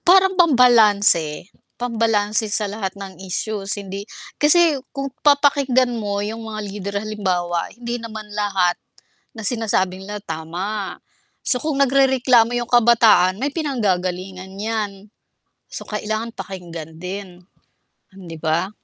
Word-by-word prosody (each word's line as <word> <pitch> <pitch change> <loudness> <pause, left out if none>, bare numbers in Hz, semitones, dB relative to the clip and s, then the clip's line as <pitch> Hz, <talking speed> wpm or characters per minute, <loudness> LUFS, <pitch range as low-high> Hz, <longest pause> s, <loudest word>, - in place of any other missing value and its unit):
parang 380 +1 +5
pambalanse, 215 - +4 0.2
pambalanse 225 -3 0
sa 210 +1 0
lahat 200 -1 -4
ng 195 -1 -9
issues 200 +2 -3
hindi 200 +1 -7 0.3
kasi 305 -1 +5 0.2
kung 275 -1 -3
papakinggan 280 -3 +3
mo 205 -3 -2
yung 225 +1 -5
mga 215 -1 -5
leader 200 0 -5
halimbawa 180 -5 -1
hindi 240 0 -4
naman 220 -2 -7
lahat 195 -4 0 0.5
na 220 - -8
sinasabi 200 -4 -1
nila 205 0 -6
tama. 180 +5 -5 0.5
So, 250 - +4
kung 305 -3 -1
nagrereklamo 260 -3 +4
yung 240 - -4
kabataan, 225 -6 +5
may 280 - +1
pinanggagalingan 190 - -2
'yan. 210 +1 -2 0.8
So, - - -7
kailangan 215 +2 -3
pakinggan 170 -4 -8
din, 180 -1 -8 0.7
'di 170 -4 -10
ba? 160 +4 0
210 Hz, 120 wpm, -21 LUFS, 190-240 Hz, 0.8 s, parang